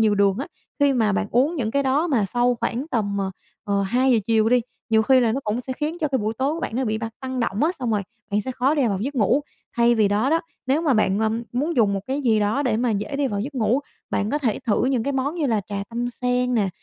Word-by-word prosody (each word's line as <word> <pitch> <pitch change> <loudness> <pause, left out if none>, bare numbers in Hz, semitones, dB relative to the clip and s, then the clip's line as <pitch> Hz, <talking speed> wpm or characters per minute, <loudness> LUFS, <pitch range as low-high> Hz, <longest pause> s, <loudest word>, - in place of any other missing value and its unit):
nhiều 215 -2 +4
đường 200 -1 +3
á. 275 - -3 0.3
Khi 285 -1 +4
mà 220 -6 +2
bạn 210 +1 0
uống 270 +8 +2
những 230 -7 -1
cái 280 +4 +1
đó 275 +5 +2
mà 250 - +2
sau 245 +5 +1
khoảng 235 +4 -2
tầm, 205 -4 -1
ờ, 195 -1 -1 0.3
ờ, 200 -1 0
2:00 245 +4 +3
chiều 225 -1 +3
đi, 250 +1 +4 0.3
nhiều 220 0 +4
khi 260 +3 +5
là 230 -3 +2
nó 265 - -1
cũng 215 +3 -1
sẽ 260 +1 -5
khiến 305 +5 -3
cho 305 - 0
cái 265 -2 0
buổi 215 +1 -2
tối 275 +4 +1
của 335 - -5
bạn 230 - -3
nó 260 - 0
bị 220 -2 -1
bạt 225 0 -5
tăng 260 -1 -3
động 225 +1 -1
á, 325 - +3
xong 250 -3 -2
rồi 210 -2 +1 0.3
bạn 205 +1 +1
sẽ 260 - -4
khó 265 +4 +1
đi 280 -5 +2
vào 195 -3 -1
giấc 275 +7 -3
ngủ. 250 +3 +3 0.4
Thay 235 0 +4
vì 215 -3 +3
đó 210 +7 +1
đó, 325 +1 +3 0.3
nếu 280 +5 +2
mà 290 -6 +3
bạn, 205 -3 +2
ờ, 220 0 +1 0.2
muốn 290 +7 -1
dùng 215 -4 +4
một 195 - -1
cái 270 +2 -2
gì 225 -4 +3
đó 210 +8 +1
để 240 -5 +1
mà 240 +1 +1
dễ 210 +6 -2
đi 285 0 +1
vào 205 -5 -2
giấc 275 +7 -5
ngủ, 245 +2 +1 0.3
bạn 210 +1 0
có 295 - +1
thể 240 -8 0
thử 220 0 +2
những 255 -3 +1
cái 280 +4 -1
món 270 +3 -1
như 325 -4 0
là 225 -5 +1
trà 200 -1 -3
tâm 240 +1 -3
sen 250 0 0
nè, 210 -4 +2
240 Hz, 290 wpm, -23 LUFS, 215-270 Hz, 0.4 s, khi